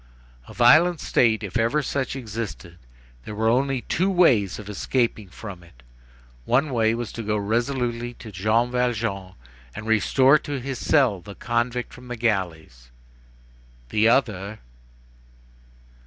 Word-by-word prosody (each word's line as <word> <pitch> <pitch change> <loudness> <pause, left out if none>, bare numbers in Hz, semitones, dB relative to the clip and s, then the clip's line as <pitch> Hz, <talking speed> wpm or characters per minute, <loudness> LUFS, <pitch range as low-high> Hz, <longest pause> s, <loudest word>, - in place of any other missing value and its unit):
A - - -11
violent 155 +8 +5
state, 110 -3 +2
if 100 +2 -3
ever 120 +7 +1
such 135 0 -2
existed. 110 -8 -7 0.4
There 105 - -7
were 110 +1 +1
only 130 +2 +1
two 185 +9 0
ways 125 - +3
of 105 - -10
escaping 110 -1 -1
from 95 0 -9
it. 75 -8 -20 0.6
One 135 +4 +2
was 115 0 0
to 115 - -6
go 105 -1 -1
resolutely 120 +2 -2
to 110 - -11
Jean 110 +6 +1
Valjean, 115 -6 -2 0.4
and 110 - -7
restore 130 +6 +4
to 145 -2 -5
his 130 +1 -5
cell 125 - +2
the 100 +3 -11
convict 120 +1 -2
from 125 0 -13
the 120 - -5
galleys. 85 - -2 1.0
The 110 - +3
other.... 110 -5 0
115 Hz, 135 wpm, -24 LUFS, 105-125 Hz, 1.0 s, violent